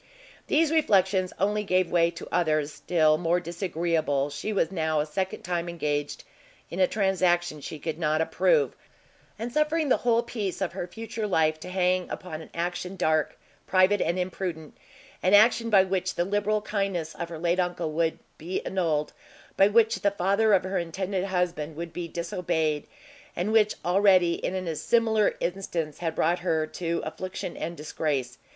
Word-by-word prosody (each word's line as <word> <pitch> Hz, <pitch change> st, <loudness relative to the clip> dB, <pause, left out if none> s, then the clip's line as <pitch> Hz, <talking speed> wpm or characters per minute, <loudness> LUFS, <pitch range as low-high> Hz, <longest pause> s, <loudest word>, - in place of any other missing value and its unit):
These 315 Hz, 0 st, +3 dB
reflections 190 Hz, -, +3 dB
only 210 Hz, +2 st, +1 dB
gave 185 Hz, -3 st, +1 dB
way 170 Hz, -1 st, +4 dB
to 170 Hz, -, -9 dB
others 155 Hz, -4 st, +1 dB
still 155 Hz, -3 st, +2 dB
more 175 Hz, +1 st, +2 dB
disagreeable; 165 Hz, -5 st, -1 dB
she 150 Hz, +9 st, -4 dB
was 195 Hz, -5 st, +1 dB
now 160 Hz, -4 st, 0 dB
a 150 Hz, -, +1 dB
second 185 Hz, +5 st, -3 dB
time 175 Hz, -1 st, -2 dB
engaged 145 Hz, -3 st, -2 dB, 0.5 s
in 175 Hz, -, -5 dB
a 185 Hz, -, +5 dB
transaction 175 Hz, -6 st, +1 dB
she 155 Hz, -, -6 dB
could 160 Hz, +1 st, -5 dB
not 155 Hz, -1 st, +1 dB
approve, 460 Hz, -, +2 dB, 0.6 s
and 235 Hz, +3 st, -5 dB
suffering 305 Hz, 0 st, +1 dB
the -, -, +4 dB
whole 235 Hz, -1 st, +2 dB
peace 210 Hz, -6 st, -4 dB
of 190 Hz, -3 st, -2 dB
her 180 Hz, -1 st, -4 dB
future 225 Hz, +2 st, -5 dB
life 155 Hz, -4 st, +2 dB
to 180 Hz, -, -8 dB
hang 185 Hz, 0 st, +1 dB
upon 160 Hz, -4 st, -6 dB
an 160 Hz, -, -12 dB
action 175 Hz, +2 st, -3 dB
dark, 155 Hz, -4 st, +1 dB, 0.3 s
private 190 Hz, +2 st, +4 dB
and 170 Hz, -, 0 dB
imprudent: 180 Hz, -4 st, -4 dB, 0.5 s
an 185 Hz, +3 st, +5 dB
action 230 Hz, +2 st, +5 dB
by 195 Hz, -3 st, +6 dB
which 185 Hz, -1 st, -2 dB
the 175 Hz, -, 0 dB
liberal 205 Hz, +2 st, 0 dB
kindness 195 Hz, -6 st, -2 dB
of 170 Hz, -, -5 dB
her 165 Hz, -, -6 dB
late 170 Hz, +2 st, 0 dB
uncle 175 Hz, -3 st, -1 dB
would 160 Hz, +1 st, 0 dB, 0.2 s
be 175 Hz, +4 st, -3 dB
annulled, 160 Hz, -6 st, -1 dB, 0.4 s
by 195 Hz, -, +6 dB
which 225 Hz, +1 st, +3 dB
the 200 Hz, -, +2 dB
father 200 Hz, +3 st, +2 dB
of 190 Hz, -, +4 dB
her 190 Hz, +1 st, -1 dB
intended 185 Hz, +3 st, -2 dB
husband 180 Hz, -5 st, -2 dB
would 170 Hz, +1 st, -6 dB
be 175 Hz, -1 st, -4 dB
disobeyed, 160 Hz, -4 st, -2 dB, 0.5 s
and 185 Hz, +5 st, -1 dB
which 215 Hz, -1 st, +4 dB
already, 185 Hz, -1 st, +4 dB
in 185 Hz, -, -3 dB
a 180 Hz, -4 st, -3 dB
similar 220 Hz, +2 st, +2 dB
instance, 170 Hz, -4 st, -3 dB
had 165 Hz, -2 st, -2 dB
brought 170 Hz, +3 st, +1 dB
her 160 Hz, -3 st, 0 dB
to 170 Hz, +1 st, -3 dB
affliction 185 Hz, 0 st, -5 dB
and 170 Hz, +1 st, -5 dB
disgrace. 140 Hz, -4 st, -3 dB
180 Hz, 170 wpm, -27 LUFS, 160-195 Hz, 0.6 s, by